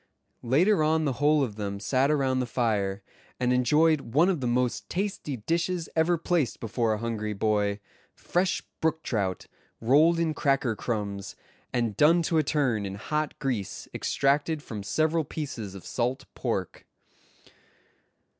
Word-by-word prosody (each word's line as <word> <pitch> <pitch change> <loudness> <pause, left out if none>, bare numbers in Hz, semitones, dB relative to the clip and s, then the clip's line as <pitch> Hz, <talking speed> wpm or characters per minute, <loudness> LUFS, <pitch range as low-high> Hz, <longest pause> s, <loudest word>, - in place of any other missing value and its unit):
Later 160 - +3
on 155 +1 +2
the 135 -4 -2
whole 150 0 +4
of 110 -5 -4
them 100 -1 -3
sat 130 +5 +1
around 135 -3 +1
the 125 - -1
fire, 100 -5 -1 0.4
and 125 0 +2
enjoyed 150 +5 +3
one 170 +5 +5
of 175 -7 0
the 125 - -1
most 125 0 0
tasty 185 -8 -3
dishes 170 - -1
ever 170 +2 +3
placed 165 -6 0
before 115 0 0
a - - -1
hungry 110 -1 -3
boy—fresh 105 - -1 0.2
brook 160 0 0
trout, 100 -5 -2 0.3
rolled 150 +8 +4
in 165 -2 +1
cracker 135 -5 +1
crumbs, 100 -4 -4 0.4
and 120 -4 0
done 165 +5 +5
to 160 0 +2
a - - +2
turn 130 -8 +1
in 100 -1 -4
hot 150 +8 -2
grease 120 -8 -3
extracted 145 +2 0
from 105 -3 -6
several 155 +10 +1
pieces 130 -10 -6
of 95 - -10
salt 130 +3 -2
pork. 100 -8 -3
130 Hz, 145 wpm, -27 LUFS, 110-155 Hz, 0.4 s, one